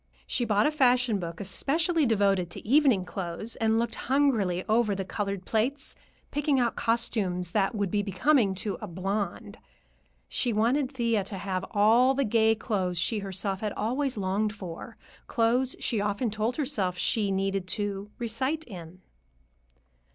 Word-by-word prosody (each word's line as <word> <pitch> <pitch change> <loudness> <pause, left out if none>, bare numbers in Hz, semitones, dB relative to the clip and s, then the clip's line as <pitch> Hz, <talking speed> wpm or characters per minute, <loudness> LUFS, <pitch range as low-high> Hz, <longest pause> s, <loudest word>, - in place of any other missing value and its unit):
She 240 - 0
bought 210 -1 +2
a 300 - +3
fashion 250 -6 +3
book 170 -2 -6
especially 310 - +1
devoted 195 -5 +2
to 175 - -7
evening 260 -7 +4
clothes 185 +5 -4
and 225 0 +2
looked 230 0 0 0.2
hungrily 225 -11 +2
over 215 -2 +2
the 195 0 -3
colored 200 -1 -3
plates, 260 +6 -1 0.4
picking 290 -2 +1
out 240 -2 +1
costumes 200 -7 0
that 205 +2 +1
would 200 -3 -1
be 205 - +1
becoming 205 - +2
to 195 +1 -3
"a 210 - -5
blonde." 200 +3 -4 0.7
She 245 -3 -1
wanted 250 +6 +1
Thea 235 -6 0
to 200 0 -4
have 190 0 -3
all 235 +5 +4
the 275 0 +1
gay 225 0 +3
clothes 190 -6 -2
she 210 +6 +1
herself 195 0 -2
had 210 -1 -3
always 255 +4 -1
longed 205 +2 -1
for; 190 +4 -8 0.3
clothes 245 +3 +1
she 225 -5 0
often 205 +3 -1
told 220 +3 -1
herself 195 - -1
she 210 +2 +1
needed 195 -1 -1
"to 205 0 -3
recite 260 +7 -2
in." 180 - -11
215 Hz, 155 wpm, -28 LUFS, 195-245 Hz, 0.7 s, evening